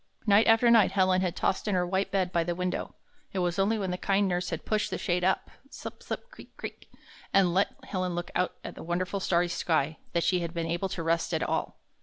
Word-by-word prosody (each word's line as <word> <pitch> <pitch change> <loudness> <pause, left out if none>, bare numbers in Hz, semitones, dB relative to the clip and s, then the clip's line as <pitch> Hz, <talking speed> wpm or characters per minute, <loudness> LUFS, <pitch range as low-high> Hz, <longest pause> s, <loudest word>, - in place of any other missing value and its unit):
Night 210 +1 +5
after 225 +1 +6
night 215 -5 +5
Helen 185 -1 +3
had 180 -2 -1
tossed 190 - 0
in 205 - +1
her 180 -1 +2
white 190 +2 0
bed 185 -2 0
by 170 -3 +2
the 175 +1 -2
window. 180 +1 -3 0.4
It - - -4
was 180 0 0
only 210 +3 +2
when 190 -3 -2
the 180 - -3
kind 200 0 +2
nurse 180 -1 -1
had 165 -1 -5
pushed 215 -1 0
the - - -2
shade 180 -2 0
up— 190 +1 +1 0.2
slip, - - -9
slip, 480 - -6
creak, - - -15
creak, - - -8 0.2
— - - -22
and 185 -3 +5
let 195 +2 +3 0.2
Helen 185 -2 -2
look 175 0 -4
out 180 - 0
at - - -6
the - - -10
wonderful 180 +3 -2
starry 175 -2 +2
sky, 160 -3 0
that 170 -1 +1
she 180 - +2
had 170 0 -4
been 165 -1 -1
able 170 +3 -1
to 175 -2 -4
rest 165 +1 +1
at - - 0
all. - - -2
185 Hz, 245 wpm, -28 LUFS, 175-195 Hz, 0.4 s, after